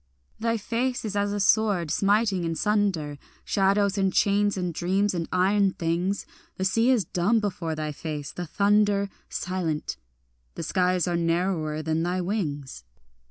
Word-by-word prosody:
Thy 230 Hz, +1 st, 0 dB
face 240 Hz, +3 st, -2 dB
is 205 Hz, -2 st, -3 dB
as 205 Hz, 0 st, +1 dB
a 205 Hz, -, -2 dB
sword 200 Hz, -5 st, +2 dB
smiting 200 Hz, 0 st, +2 dB
in 165 Hz, -1 st, -1 dB
sunder 185 Hz, -8 st, 0 dB, 0.3 s
Shadows 200 Hz, 0 st, +2 dB
and 195 Hz, -1 st, +2 dB
chains 205 Hz, +1 st, +2 dB
and 180 Hz, -2 st, -2 dB
dreams 190 Hz, +5 st, +1 dB
and 170 Hz, -2 st, -3 dB
iron 195 Hz, +1 st, +3 dB
things; 175 Hz, +4 st, -1 dB, 0.3 s
The 190 Hz, -, -1 dB
sea 225 Hz, +6 st, +3 dB
is 240 Hz, -8 st, +3 dB
dumb 190 Hz, +8 st, +1 dB
before 180 Hz, -6 st, -3 dB
thy 155 Hz, -1 st, -3 dB
face, 150 Hz, -1 st, -5 dB
the 175 Hz, -1 st, -6 dB
thunder 200 Hz, +2 st, +2 dB, 0.2 s
Silent, 175 Hz, -5 st, -3 dB, 0.6 s
the -, -, -5 dB
skies 180 Hz, -1 st, +1 dB
are 175 Hz, -, 0 dB
narrower 165 Hz, -2 st, 0 dB
than 160 Hz, +1 st, 0 dB
thy 180 Hz, +2 st, -1 dB
wings. 150 Hz, -, -3 dB
190 Hz, 155 wpm, -26 LUFS, 165-205 Hz, 0.6 s, iron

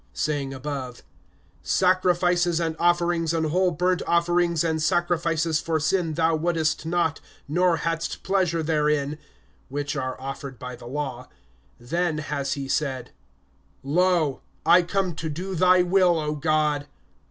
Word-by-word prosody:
(8)Saying 145 Hz, -3 st, -1 dB
above, 135 Hz, -2 st, -6 dB, 0.6 s
Sacrifices 180 Hz, -2 st, +2 dB
and 165 Hz, -1 st, -1 dB
offerings 170 Hz, -1 st, +2 dB
and 160 Hz, -1 st, 0 dB
whole 185 Hz, +2 st, +3 dB
burnt 180 Hz, +2 st, 0 dB
offerings 170 Hz, -1 st, +2 dB
and 160 Hz, -1 st, 0 dB
sacrifices 165 Hz, -2 st, +1 dB
for 160 Hz, -1 st, -1 dB
sin 165 Hz, 0 st, 0 dB
thou 165 Hz, 0 st, +2 dB
wouldest 160 Hz, -1 st, 0 dB
not, 165 Hz, -2 st, 0 dB, 0.3 s
nor 175 Hz, +3 st, +2 dB
hadst 165 Hz, +1 st, -3 dB
pleasure 180 Hz, -4 st, +1 dB
therein, 150 Hz, -1 st, 0 dB, 0.5 s
which 145 Hz, +1 st, -3 dB
are 130 Hz, -2 st, -3 dB
offered 135 Hz, 0 st, -7 dB
by 125 Hz, +1 st, -7 dB
the 120 Hz, -, -12 dB
law, 130 Hz, -2 st, -5 dB, 0.5 s
(9)then 160 Hz, +5 st, -1 dB
has 140 Hz, -2 st, -2 dB
he 140 Hz, -1 st, -5 dB
said: 135 Hz, -3 st, -2 dB, 0.7 s
Lo, 165 Hz, -1 st, +1 dB, 0.2 s
I 175 Hz, +1 st, +7 dB
come 185 Hz, +1 st, -1 dB
to 160 Hz, +1 st, -5 dB
do 180 Hz, +6 st, -5 dB
thy 180 Hz, +1 st, +4 dB
will, 180 Hz, -1 st, +3 dB
O 150 Hz, -1 st, -2 dB
God. 150 Hz, -1 st, 0 dB
160 Hz, 135 wpm, -24 LUFS, 145-175 Hz, 0.7 s, I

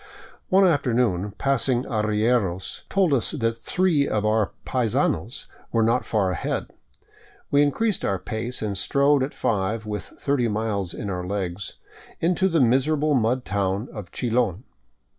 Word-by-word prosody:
One 190 Hz, +1 st, +5 dB
afternoon 120 Hz, -, +1 dB
passing 130 Hz, -2 st, +1 dB
arrieros 105 Hz, -4 st, 0 dB
told 190 Hz, -6 st, +2 dB
us 125 Hz, -5 st, +1 dB
that 115 Hz, -6 st, -1 dB
three 175 Hz, -4 st, +2 dB
of 105 Hz, -1 st, 0 dB
our 110 Hz, -1 st, +2 dB
paisanos 120 Hz, -5 st, 0 dB, 0.3 s
were 115 Hz, -, +2 dB
not 115 Hz, +3 st, +2 dB
far 100 Hz, -4 st, +1 dB
ahead. 90 Hz, -, -3 dB, 0.8 s
We 145 Hz, -, +5 dB
increased 195 Hz, +9 st, +1 dB
our 100 Hz, -, 0 dB
pace 110 Hz, +6 st, -2 dB
and 105 Hz, -2 st, -2 dB
strode 140 Hz, +8 st, +3 dB
at 135 Hz, +3 st, -1 dB
five, 105 Hz, +1 st, -1 dB
with 105 Hz, -2 st, -4 dB
thirty 140 Hz, -4 st, -1 dB
miles 105 Hz, -4 st, -2 dB
in -, -, -5 dB
our 90 Hz, -1 st, -4 dB
legs, 95 Hz, -1 st, -4 dB, 0.4 s
into 180 Hz, +3 st, +2 dB
the 165 Hz, -2 st, +2 dB
miserable 145 Hz, +5 st, +2 dB
mud 125 Hz, 0 st, +1 dB
town 100 Hz, +2 st, -1 dB
of 100 Hz, -5 st, -8 dB
Chilon. 115 Hz, -4 st, 0 dB
115 Hz, 140 wpm, -24 LUFS, 105-140 Hz, 0.8 s, One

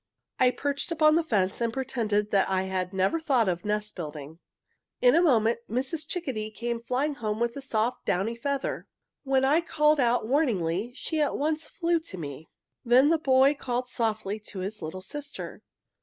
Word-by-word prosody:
"I 255 Hz, -, +6 dB
perched 280 Hz, +4 st, -2 dB
upon 310 Hz, -2 st, +4 dB
the 330 Hz, +1 st, +3 dB
fence 205 Hz, -, 0 dB
and 230 Hz, -1 st, +1 dB
pretended 225 Hz, -5 st, -1 dB
that 195 Hz, -2 st, +3 dB
I 190 Hz, 0 st, +1 dB
had 185 Hz, -1 st, -2 dB
never 190 Hz, -, +1 dB
a -, -, -7 dB
thought 260 Hz, -8 st, +2 dB
of 175 Hz, -1 st, -1 dB
nest 210 Hz, 0 st, -2 dB
building. 155 Hz, -2 st, -7 dB, 0.6 s
"In -, -, +5 dB
a 335 Hz, -, +5 dB
moment 235 Hz, -9 st, +3 dB
Mrs. 265 Hz, +7 st, -2 dB
Chickadee 260 Hz, -12 st, -3 dB
came 235 Hz, +2 st, -4 dB
flying 265 Hz, +5 st, -1 dB
home 215 Hz, -5 st, -3 dB
with 235 Hz, 0 st, 0 dB
a 280 Hz, -, -5 dB
soft, 235 Hz, -2 st, -1 dB
downy 200 Hz, +6 st, 0 dB
feather. 275 Hz, +3 st, -3 dB, 0.3 s
When 265 Hz, -1 st, +2 dB
I 300 Hz, +5 st, +4 dB
called 300 Hz, -2 st, +2 dB
out 240 Hz, -3 st, +2 dB
warningly 225 Hz, -, +1 dB
she 315 Hz, +2 st, -2 dB
at 295 Hz, -, +1 dB
once 305 Hz, +1 st, -1 dB
flew 340 Hz, -1 st, 0 dB
to 315 Hz, -, -9 dB
me. 150 Hz, -1 st, -7 dB, 0.3 s
"Then 255 Hz, +4 st, +5 dB
the 330 Hz, 0 st, +3 dB
boy 270 Hz, -1 st, +4 dB
called 250 Hz, -3 st, -3 dB
softly 220 Hz, -4 st, -1 dB
to 210 Hz, -1 st, -10 dB
his 205 Hz, +2 st, -5 dB
little 170 Hz, +4 st, -6 dB
sister. 285 Hz, +8 st, -7 dB
240 Hz, 185 wpm, -27 LUFS, 210-285 Hz, 0.6 s, I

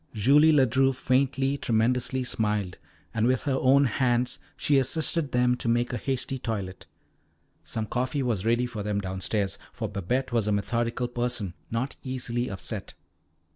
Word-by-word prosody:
Julie 140 Hz, +9 st, +5 dB
Ledru 135 Hz, -2 st, +3 dB
faintly, 135 Hz, +2 st, +1 dB
tremulously, 125 Hz, +3 st, +1 dB
smiled, 105 Hz, -6 st, -1 dB, 0.3 s
and 115 Hz, 0 st, +2 dB
with 130 Hz, 0 st, +2 dB
her 135 Hz, -2 st, 0 dB
own 140 Hz, +2 st, +5 dB
hands 125 Hz, 0 st, +1 dB, 0.2 s
she 145 Hz, -2 st, +3 dB
assisted 155 Hz, +2 st, +1 dB
them 125 Hz, 0 st, +3 dB
to -, -, -5 dB
make 120 Hz, +2 st, +1 dB
a -, -, 0 dB
hasty 135 Hz, +1 st, -2 dB
toilet. 100 Hz, -6 st, -4 dB, 0.8 s
Some 110 Hz, -1 st, -3 dB
coffee 130 Hz, +5 st, -1 dB
was 115 Hz, -7 st, -1 dB
ready 120 Hz, +2 st, +2 dB
for 115 Hz, -4 st, -5 dB
them 105 Hz, 0 st, -1 dB
downstairs, 95 Hz, +1 st, -2 dB
for 110 Hz, -, -4 dB
Babette 105 Hz, +7 st, -2 dB
was 115 Hz, -3 st, +1 dB
a -, -, +2 dB
methodical 115 Hz, +4 st, -1 dB
person, 120 Hz, -6 st, -2 dB, 0.2 s
not 120 Hz, +4 st, -3 dB
easily 125 Hz, -2 st, -3 dB
upset. 95 Hz, -2 st, -6 dB
120 Hz, 150 wpm, -27 LUFS, 110-130 Hz, 0.8 s, Julie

